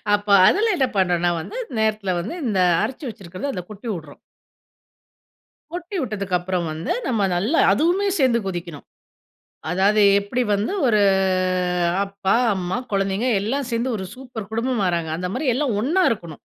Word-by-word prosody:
அப்ப 205 0 -7 0.2
அதில 435 +1 +3
என்ன 265 - +2
பண்ணும்ன்னா 175 -2 +2
வந்து, 450 - -8 0.2
நேரத்தில 215 -4 0
வந்து, 180 - -5
இந்த 210 -5 0 0.2
அரைச்சி 260 +7 -4
வச்சிருக்கிறது 195 +5 -6
அதை 180 - -5
கொட்டி 210 +3 -9
உட்றோம். 150 -3 -13 1.5
கொட்டி 355 +3 -5
உட்டதுக்கப்புறம் 185 -6 -2
வந்து, 160 +2 -3
நம்ம 225 -5 0
நல்லா 215 - +1
அதுவுமே 345 - +2
சேர்ந்து 255 -4 +3
கொதிக்கணும். 175 -5 -6 0.8
அதாவது 200 +4 +3 0.2
எப்படி 205 +5 -2
வந்து 205 - -1
ஒரு 215 -4 +3 1.0
அப்பா, 195 -1 -1 0.2
அம்மா, 180 0 -2 0.2
குழந்தைகள் 200 +4 +1
எல்லாம் 255 +6 -2
சேர்ந்து 235 +2 -1
ஒரு 190 - -5
சூப்பர் 245 -6 -8
குடும்பமாறாங்க, 200 -9 0
அந்த 180 +2 -3
மாதிரி 260 0 0
எல்லாம் 265 -3 0
ஒண்ணா 325 - +2
இருக்கணும்! 170 -9 -5
210 Hz, 140 wpm, -22 LUFS, 185-255 Hz, 1.5 s, அதில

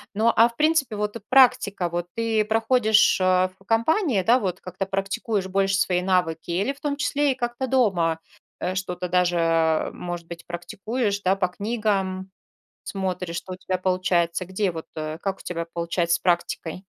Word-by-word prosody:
Но, 225 +3 +3
а, 230 +1 +6
в 235 - -17
принципе, 305 -6 +2
вот, 210 +1 -2
э, - - -5
практика 245 -8 +4
вот 175 +1 -3
ты 225 -1 +1
проходишь, 220 0 +3
э, 185 0 +3
в - - -21
компании, 230 - +2
да, 240 +6 +4
вот 185 -4 -3
как-то 185 +1 -5
практикуешь 195 +1 -2
больше 195 0 +1
свои 180 -2 +1
навыки 180 -4 0
или, 195 +10 0
в 280 - -21
том 290 -2 -2
числе, 290 -1 +1
и - - -15
как-то 240 +1 -3
дома, 185 -11 +2 0.4
э, 180 - -2
что-то 180 -1 -3
даже, 180 0 +2
э, 165 -1 +2
может 175 -1 -6
быть, 170 0 -10
практикуешь, 200 +5 -3
да, 190 0 +2
по 195 -2 +1
книгам 195 -2 -2 0.5
смотришь, 180 -3 -3
что 185 +2 -5
у - - -10
тебя 185 0 -2
получается? 185 -1 0
Где 190 +2 -1
вот, 165 -2 -7
э, 155 0 -5
как 195 -1 -3
у - - -13
тебя 170 -1 -4
получается 170 0 0
с - - -10
практикой? 175 0 -1
190 Hz, 180 wpm, -24 LUFS, 175-225 Hz, 0.5 s, а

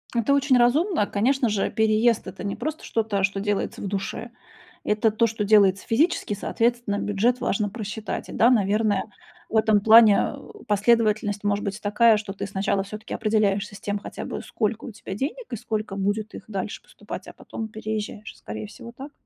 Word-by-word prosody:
Это 235 +4 +2
очень 280 -2 +3
разумно. 255 - +3
Конечно 255 +5 +1
же, 205 -2 0
переезд- 220 +1 +2
это 185 0 -8
не 200 -1 -3
просто 310 +1 -4
что-то, 215 -3 -1
что 195 0 +1
делается 205 0 -2
в - - -3
душе. 200 +4 -4 0.5
Это 210 +1 +2
то, 220 +2 +2
что 220 -1 -3
делается 200 -2 +4
физически. 290 - +1
Соответственно, 230 0 -1
бюджет 220 +5 +1
важно 210 -4 0
просчитать. 215 0 -5
И - - -7
да, 235 - +5
наверное, 210 -3 +2 0.5
в - - -5
этом 220 -1 +4
плане, 220 0 +6
э, 425 -1 -13
последовательность 210 -1 +2
может 205 0 0
быть 200 +1 -4
такая, 215 +2 +4
что 210 -2 -5
ты 195 - -5
сначала 195 0 -1
всё-таки 215 +3 -8
определяешься 210 -2 0
с - - -10
тем 205 0 -3
хотя - - -7
бы, - - -5
сколько 220 0 -2
у 250 - -6
тебя 200 - -8
денег, 300 - -4
и - - -2
сколько 215 -2 -4
будет 205 +2 -2
их - - -9
дальше 205 -1 -4
поступать, - - -9
а - - -10
потом 220 - -7
переезжаешь. 215 0 -5
Скорее 105 0 -7
всего, 235 - -11
так. 275 +2 -8
215 Hz, 185 wpm, -24 LUFS, 205-230 Hz, 0.5 s, плане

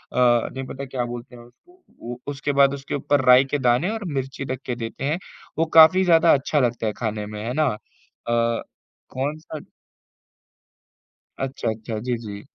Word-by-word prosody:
नहीं 125 +1 +2
पता 140 +1 -6
क्या 130 -2 -3
बोलते 120 0 -8
हैं 120 - -12
उसको। 355 - -22 0.2
वो 120 +1 -7
उसके 145 +1 -2
बाद 140 0 +5
उसके 140 0 -5
ऊपर 145 0 +1
राई 125 +1 +7
के 140 +2 -1
दाने 125 +8 +2
और 220 -1 -4
मिर्ची 135 0 -4
रख 130 - -3
के 125 - -2
देते 115 +2 -6
हैं। 150 +4 0 0.4
वो 165 - +3
काफ़ी 165 +4 +8
ज़्यादा 165 -2 +5
अच्छा 145 +2 +1
लगता 120 -3 0
है 105 - -1
खाने 110 -2 -3
में, 105 0 -7
है 120 - -2
ना। 155 +1 +2 0.6
अ, 115 0 +1 0.5
कौन 145 +4 -2
सा 155 -1 -8 1.8
अच्छा, 135 -3 -2
अच्छा, 110 0 -4
जी, 125 +1 -2
जी। 105 -3 -8
130 Hz, 175 wpm, -23 LUFS, 120-145 Hz, 1.8 s, काफ़ी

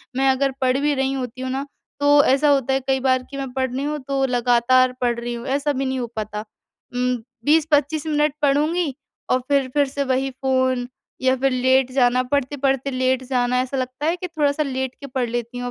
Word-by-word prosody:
मैं 270 +1 +2
अगर 270 +1 +2
पढ़ 255 0 +2
भी 290 +1 +1
रही 270 0 0
होती 255 -1 -5
हूँ 260 - -3
ना 270 +2 -2 0.3
तो 290 0 +5
ऐसा 280 +3 +3
होता 270 -2 +2
है 265 - +2
कई 265 0 +2
बार 260 -1 +1
कि 275 - -6
मैं 270 -2 -4
पढ़ 260 -1 -1
रही 265 +2 -3
हूँ 300 +1 -2
तो 275 -1 +1
लगातार 250 +1 +3
पढ़ 240 -1 +1
रही 240 0 -4
हूँ 235 +1 -6
ऐसा 280 +2 0
भी 270 0 -2
नहीं 260 0 -1
हो 240 - -3
पाता। 210 -1 -4 0.6
उम, 250 0 +1 0.3
20-25 300 0 +2
मिनट 300 -1 +1
पढूँगी 295 +2 +1 0.4
औ 255 - +4
फिर, 280 -2 +2
फिर 285 -2 +3
से 280 +1 -2
वही 265 0 0
फ़ोन 260 -1 0 0.3
या 260 0 +3
फिर 270 +1 +1
लेट 260 +1 +2
जाना, 255 -1 +3
पढ़ते-पढ़ते 270 0 -1
लेट 260 0 0
जाना 250 -1 +1
ऐसा 260 +1 -3
लगता 255 +3 -3
है 330 - +2
कि 365 0 -6
थोड़ा-सा 305 -3 0
लेट 260 -2 -3
के 280 - -7
पढ़ 255 -2 -2
लेती 240 +1 -4
हूँ 245 0 -3
265 Hz, 215 wpm, -22 LUFS, 255-280 Hz, 0.6 s, तो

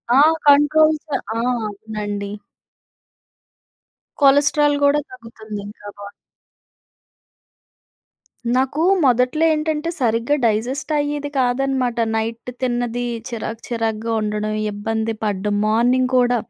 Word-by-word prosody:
ఆ! - - +6 0.3
కంట్రోల్స్ 310 +2 +4 0.3
ఆ! - - -1 0.3
అవునండి. 205 -1 -5 1.9
కొలెస్టెరాల్ 290 +1 +4
కూడా 290 +1 +4
తగ్గుతుంది 225 -4 -9
ఇంకా 205 0 -12
బాడి‌లో. 200 0 -9 2.4
నాకు 265 +4 0 0.2
మొదట్లో 255 +5 +2
ఏంటంటే 310 +1 -1
సరిగ్గా 235 +4 +1
డైజెస్ట్ 245 +8 -1
అయ్యేది 290 0 -2
కాదన్నమాట. 255 -1 0 0.2
నైట్ 225 +2 -3
తిన్నది, 245 -1 -1 0.2
చిరాకు 230 -1 -5
చిరాకుగా 225 -1 -2
ఉండడం, 210 0 -2 0.2
ఇబ్బంది 220 +2 -2
పడ్డం, 205 0 -1
మార్నింగ్ 245 +4 +2
కూడా 245 -1 +3
245 Hz, 90 wpm, -20 LUFS, 220-280 Hz, 2.4 s, ఆ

